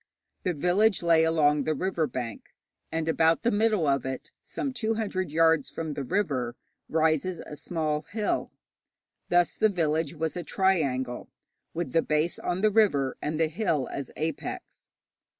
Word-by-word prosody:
The 180 -2 -1
village 180 +6 +2
lay 165 -1 +5
along 150 -3 +3
the 155 - +1
river 175 -1 0
bank, 120 -5 -6 0.4
and 160 0 -2
about 165 +2 +3
the 235 - +3
middle 210 -4 +2
of 140 -2 +2
it, 130 0 -5
some 275 - -4
two 225 -3 -1
hundred 185 -6 -2
yards 160 -2 +3
from 160 -2 -4
the 140 - -4
river, 130 -6 -1 0.3
rises 160 +2 +1
a 150 - -9
small 155 -1 -2
hill. 210 0 -1 0.8
Thus 175 -1 +3
the 215 - +3
village 160 -4 0
was 160 0 -2
a 175 - -3
triangle, 140 -10 0 0.5
with 170 0 -2
the 165 - +4
base 155 +3 0
on 180 +1 -2
the 215 0 +4
river, 145 - +3
and 155 +1 -2
the 165 - +4
hill 155 - -1
as 140 - -5
apex. 160 -1 -5
160 Hz, 160 wpm, -27 LUFS, 150-185 Hz, 0.8 s, lay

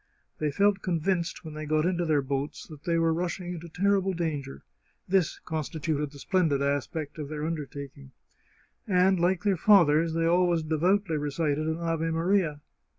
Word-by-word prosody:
They 150 - 0
felt 200 +6 +2
convinced, 170 -1 -1
when 155 - -7
they 155 0 -6
got 155 +1 +2
into 175 -1 0
their 150 -3 +2
boats, 140 +2 -3
that 155 -2 -13
they 170 -2 +1
were 165 0 +2
rushing 175 +1 -3
into 170 0 -8
terrible 195 +2 +1
danger 150 - -4 0.2
— - - -42
this 185 -3 +1
constituted 155 -1 -3
the 145 - -12
splendid 160 -2 +1
aspect 145 +2 -2
of 145 -2 -5
their 150 0 -4
undertaking 140 - -6 0.5
— - - -33 0.2
and, 185 -1 +3
like 180 +2 +1
their 200 -3 +2
fathers, 165 -4 +4
they 165 0 +1
always 175 -1 +3
devoutly 165 +3 +1
recited 150 +1 -1
an 160 0 -1
Ave 165 -1 -1
Maria. 165 -2 +1
165 Hz, 170 wpm, -27 LUFS, 150-180 Hz, 0.5 s, fathers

